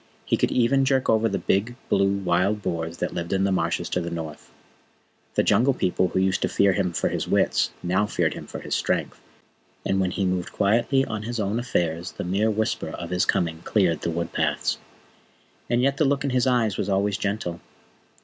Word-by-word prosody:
He - - +2
could - - +1
even 130 +3 +3
jerk 135 -1 +2
over 110 0 +3
the 100 - -1
big, 110 +5 0
blue 100 0 +3
wild 95 +3 +1
boars 85 0 -3
that - - -2
lived 85 0 -4
in 95 0 +2
the 100 - +2
Marshes 95 - -1
of 90 - 0
the 85 - -3
North. 80 -3 -7 0.9
The - - +3
Jungle 130 +2 +3
People 90 0 +1
who 90 - -3
used 95 0 +1
to - - +1
fear 100 -1 +3
him 90 -2 0
for 85 - 0
his - - -3
wits - - +2 0.4
feared - - 0
him - - -8
now - - -18
for - - -5
his - - -5
strength, - - -1 0.6
and 95 0 +1
when 95 -1 +1
he 95 +1 -1
moved 90 -1 -2
quietly 120 +6 +2
on 110 -4 -4
his 115 +2 -4
own 105 +2 0
affairs 85 -7 -1
the - - -5
mere 100 +5 +1
whisper 110 0 -1
of 85 +1 -7
his 90 0 +2
coming 80 -2 0
cleared 85 -2 +1
the - - -1
wood 85 0 -3
paths. - - 0 0.9
And 120 +1 +2
yet 140 +1 +2
the 155 - +3
look 140 +1 +1
in 140 - -1
his 125 0 +2
eyes 115 -5 +2
was 100 - -2
always 100 +1 +1
gentle. 100 -4 -3
100 Hz, 210 wpm, -24 LUFS, 90-115 Hz, 0.9 s, even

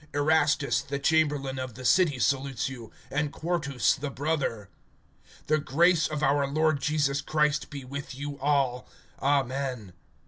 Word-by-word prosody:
Erastus 145 -1 +2
the 140 0 -4
chamberlain 145 -3 +1
of 130 -3 -5
the 130 +1 -9
city 160 -1 +4
salutes 135 0 0
you, 120 -4 -8 0.2
and 150 0 -1
Quartus 150 -7 0
the 145 +1 -4
brother. 140 -7 -2 0.8
(24)The 155 -1 +1
grace 170 +3 +3
of 150 -1 -4
our 140 0 +2
Lord 155 0 +1
Jesus 145 -1 +1
Christ 150 -1 0
be 140 -3 -8
with 140 0 -7
you 140 +1 -6
all. 135 -3 0 0.3
Amen. 130 -6 -1
140 Hz, 140 wpm, -27 LUFS, 135-150 Hz, 0.8 s, city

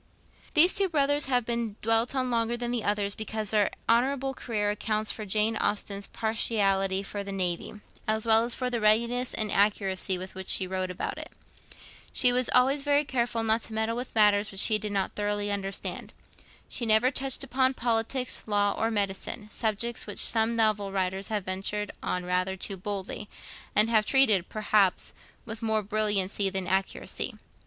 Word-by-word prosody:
These 335 +4 +7
two 390 -1 +2
brothers 290 -2 +1
have 250 -3 0
been 235 -3 -3
dwelt 225 +3 +1
on 255 -1 -1
longer 230 0 0
than 240 0 -3
the 240 -3 -2
others 205 -1 0
because 220 -1 -4
their 210 -2 +2 0.2
honourable 270 +3 +1
career 210 -5 -2
accounts 215 0 -1
for 215 -2 -6
Jane 215 +3 +1
Austen's 200 -1 -1
partiality 195 -4 0
for 200 0 -5
the 200 - -7
Navy, 185 +2 -3 0.3
as 220 +1 0
well 225 0 +5
as 235 0 -1
for 250 -1 -3
the 240 - -1
readiness 235 +4 +2
and 215 -2 -1
accuracy 195 -2 +1
with 185 +1 -8
which 190 0 -8
she 190 - +5
wrote 185 0 -3
about 180 - -5
it. - - -6 0.8
She 250 -1 +4
was 250 0 +1
always 270 +3 +4
very 290 +1 +2
careful 235 -3 -1
not 225 +1 +2
to 225 - -5
meddle 220 +1 -1
with 245 0 -6
matters 210 -1 +4
which 195 0 +2
she 215 -2 +3
did 210 -1 -5
not 195 -1 -1
thoroughly 205 0 -2
understand. 195 -1 -5 0.5
She - - -5
never 220 +4 +4
touched 270 0 -1
upon 260 0 +1
politics, 240 +2 0
law, 205 -1 +1
or 225 - 0
medicine, 205 +1 -3
subjects 230 +1 -2
which - - -7
some 225 0 +4
novel 215 -3 +1
writers 190 0 -2
have 210 -3 -3
ventured 195 +2 -2
on 180 0 -3
rather 185 +1 -1
too 195 +1 -5
boldly, 200 +2 -5 0.5
and 210 +1 +5
have 215 -2 +3
treated, 220 -10 +4
perhaps, 210 -3 +1 0.3
with 225 -1 -7
more 220 -1 0
brilliancy 205 -2 +1
than 190 -1 -3
accuracy. 190 +2 -2
215 Hz, 175 wpm, -27 LUFS, 200-235 Hz, 0.8 s, These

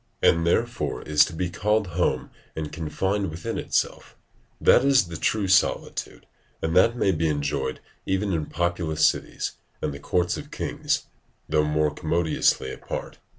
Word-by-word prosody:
and 85 +1 +3
therefore 120 +7 0
is 75 -1 +5
to - - -3
be 90 +2 -2
called 105 +4 +1
home 85 +1 0 0.2
and 80 -1 -4
confined 95 +5 -1
within 80 +2 -4
itself: - - -2 0.4
that 125 - +5
is 135 -10 +4
the 85 - -6
true 100 +5 0
solitude, 95 0 +1 0.3
and 80 +1 -1
that 115 +6 +5
may 100 - +3
be 80 -2 0
enjoyed 70 -3 -1 0.3
even 95 +1 0
in 80 -3 -1
populous 85 -2 0
cities - - 0 0.3
and 75 - -2
the 70 - -8
courts 90 +4 0
of - - -8
kings, - - -2 0.4
though 75 0 +2
more 75 0 +1
commodiously 80 0 +1
apart. - - -6
85 Hz, 150 wpm, -25 LUFS, 75-95 Hz, 0.4 s, is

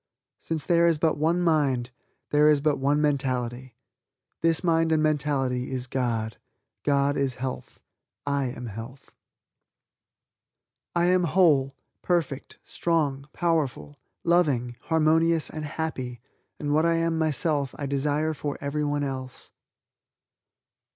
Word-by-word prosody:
Since 160 -3 -3
there 170 -1 +4
is 165 -2 +3
but 160 +1 +2
one 165 +3 +2
mind, 140 -7 +1 0.4
there 150 +1 +5
is 150 -1 +4
but 145 0 +1
one 145 +2 +2
mentality. 130 -4 -1 0.7
This 165 +1 +2
mind 165 -2 +2
and 155 -1 +3
mentality 140 -4 0
is 130 -1 -3
God; 120 -4 -2 0.4
God 140 0 +2
is 135 -2 0
health. 130 0 -6 0.5
I 140 -1 0
am 125 -1 -5
health. 115 +5 -9 1.8
"I 175 0 +3
am 180 0 +3
whole, 150 -6 +3 0.3
perfect, 165 -6 -1
strong, 145 -5 -1
powerful, 155 -4 -1 0.3
loving, 145 -9 +2
harmonious 160 0 +3
and 155 -1 -5
happy 140 -6 -4 0.4
and 145 -1 -1
what 155 +1 +3
I 170 0 +3
am 165 0 +1
myself 150 -3 0
I 145 - -4
desire 145 +3 0
for 145 -1 -4
everyone 145 0 -1
else." 130 -2 -6
145 Hz, 125 wpm, -26 LUFS, 130-160 Hz, 1.8 s, there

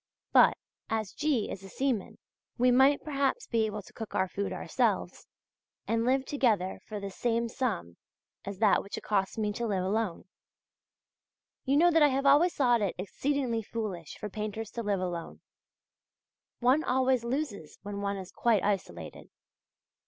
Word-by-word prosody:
But, - - +6 0.3
as 220 -3 -2
G. 295 -8 0
is 195 - -7
a 195 - -10
seaman, 255 -3 -2 0.4
we 250 +1 +4
might 265 +3 +5
perhaps 290 - 0
be 225 - +1
able 210 -1 -5
to - - -17
cook 225 - -7
our 190 - +2
food 200 +2 -3
ourselves, - - -1 0.6
and 230 0 +1
live 265 +1 +2
together 220 -10 +1
for 210 -1 -5
the 200 -1 -5
same 235 +3 0
sum 220 - -3 0.5
as 200 -1 -6
that 210 0 +4
which 200 - -7
it - - -7
costs 195 -1 0
me 210 -1 0
to 235 +2 -2
live 190 -4 0
alone. 200 -1 -1 1.4
You 275 +1 +3
know 345 +3 +6
that 325 -1 +4
I 295 - +8
have 275 0 0
always 295 +6 +5
thought 245 -4 +3
it 200 -3 0
exceedingly 240 +5 -1
foolish 200 -7 -5
for 210 - -5
painters 215 +1 -5
to 235 - -4
live 205 -4 0
alone; 175 -2 -5 1.2
one 260 +6 +4
always 255 -1 +2
loses 235 - -3
when 200 0 -5
one 200 0 -1
is 190 -1 -8
quite 225 -5 +2
isolated. 85 - -3
225 Hz, 165 wpm, -30 LUFS, 200-260 Hz, 1.4 s, I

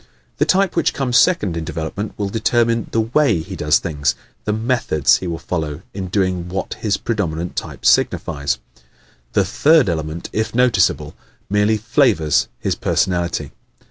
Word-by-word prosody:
The - - +2
type 195 0 +2
which 170 - +1
comes 125 -3 +2
second 135 - +2
in 85 - -3
development 80 +7 -5
will 100 -1 -2
determine 115 +1 +1
the 115 - +2
WAY 115 - +2
he 95 +4 -8
does 75 -3 +3
things 70 -6 -1 0.3
the 105 - 0
METHODS 110 - +2
he 95 - -5
will 85 -1 -3
follow 80 -2 -4
in 95 -1 -4
doing 90 -2 -1
what 95 +2 -3
his 105 -3 0
predominant 90 -6 -3
type - - -6
signifies. 70 -5 +2 0.8
The 100 - +3
third 145 - +4
element, 80 0 -3
if 110 +1 -2
noticeable, 110 - +2 0.4
merely 105 +1 +3
"flavors" 105 - +2
his - - -1
personality. 85 -5 -1
95 Hz, 150 wpm, -19 LUFS, 80-115 Hz, 0.8 s, third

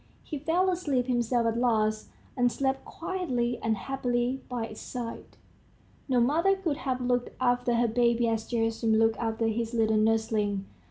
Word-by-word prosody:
He 300 - -5
fell 350 +6 +2
asleep 290 -9 0
himself 240 -1 +1
at 230 0 0
last, 215 -3 +1 0.3
and 245 -2 +2
slept 270 +1 -1
quietly 255 -10 -2
and 220 -1 0
happily 250 +1 -1
by 245 -3 -2
its 215 -1 -9
side. 240 -2 -7 0.7
No 255 -2 +3
mother 325 +11 +3
could 340 -7 -2
have 260 -4 -2
looked 245 0 0
after 245 -1 +2
her 235 0 +3
baby 235 +1 +2
as 225 -1 -1
Gerasim 225 -1 +1
looked 225 0 +3
after 225 -1 -1
his 225 +1 -1
little 220 -1 +3
nursling. 215 -2 +1
240 Hz, 160 wpm, -28 LUFS, 225-260 Hz, 0.7 s, No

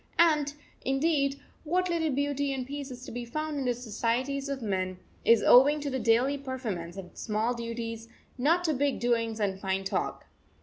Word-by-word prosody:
And, 300 -4 +4 0.3
indeed, 275 0 +1 0.2
what 360 +4 +1
little 335 -2 0
of 280 - 0
beauty 285 0 0
and 260 -2 -3
peace 285 +1 -5
is 250 0 -9
to - - -8
be 245 +1 -4
found 305 +4 -3
in 270 - -2
the 245 -1 +1
societies 250 +4 -1
of 275 -1 -2
men 185 -3 -1 0.3
is 230 -2 +5
owing 285 +4 +7
to 290 -1 -3
the 260 - -1
daily 240 +5 +3
performance 220 -11 -4
of 185 -2 -9
small 220 +2 0
duties, 230 -1 -5 0.3
not 320 +8 +2
to 320 -3 +2
big 280 0 0
doings 230 -2 0
and 195 -2 0
fine 190 0 -1
talk. 195 - -2
260 Hz, 185 wpm, -29 LUFS, 230-285 Hz, 0.3 s, owing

